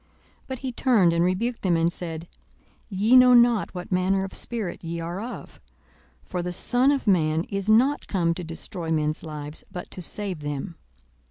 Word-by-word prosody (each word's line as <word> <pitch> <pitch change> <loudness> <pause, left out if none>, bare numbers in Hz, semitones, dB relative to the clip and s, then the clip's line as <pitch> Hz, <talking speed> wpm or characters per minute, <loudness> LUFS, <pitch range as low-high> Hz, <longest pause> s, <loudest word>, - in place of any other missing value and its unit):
42:009:055 - - -37 0.4
But 260 - -4
he 260 -1 -4
turned, 225 -9 +3
and 170 0 +2
rebuked 220 +7 -1
them, 175 -3 +2
and 165 +1 +1
said, 165 -2 -6 0.6
Ye 210 +5 +3
know 250 -1 +8
not 235 -4 +4
what 180 +1 -7
manner 190 +1 +1
of 195 - -6
spirit 220 -9 -2
ye 170 0 -4
are 170 +4 -4
of. 240 +3 -8 0.6
42:009:056 - - -32
For 180 - -1
the 180 +1 -3
Son 245 +9 +2
of 280 -2 -1
man 160 -5 +2
is 195 +1 -3
not 255 +7 +3
come 170 -4 +1
to 180 - -6
destroy 165 +1 -6
men's 155 -1 0
lives, 150 -1 -6
but 180 - -7
to 185 - -7
save 190 -1 -3
them. 145 +4 -4
185 Hz, 190 wpm, -25 LUFS, 165-225 Hz, 0.6 s, know